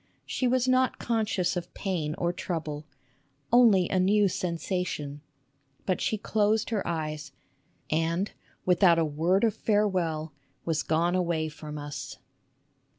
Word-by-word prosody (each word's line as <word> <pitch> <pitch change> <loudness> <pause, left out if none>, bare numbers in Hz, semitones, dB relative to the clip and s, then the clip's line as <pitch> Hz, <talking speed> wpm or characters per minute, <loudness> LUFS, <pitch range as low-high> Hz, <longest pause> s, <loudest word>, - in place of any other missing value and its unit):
She 255 - -1
was 255 0 +2
not 255 0 +3
conscious 215 -6 0
of 175 0 -4
pain 160 -6 -2
or 175 0 -1
trouble, 155 -4 -4 0.3
" 140 - -30
only 220 -7 +6
a 185 - +1
new 200 +2 +4
sen 175 -1 -2
sation," 155 -6 -3 0.7
but 185 - 0
she 215 - 0
closed 215 +1 +1
her 215 -3 +1
eyes, 155 -2 -3 0.6
and 165 +5 0 0.3
without 180 -1 +5
a 165 - +3
word 165 +7 +1
of 225 -2 +3
farewell, 180 -8 0 0.3
was 160 -2 0
gone 165 +4 +1
away 170 -3 0
from 150 -1 -8
us. 145 -2 -6
175 Hz, 140 wpm, -28 LUFS, 155-205 Hz, 0.7 s, only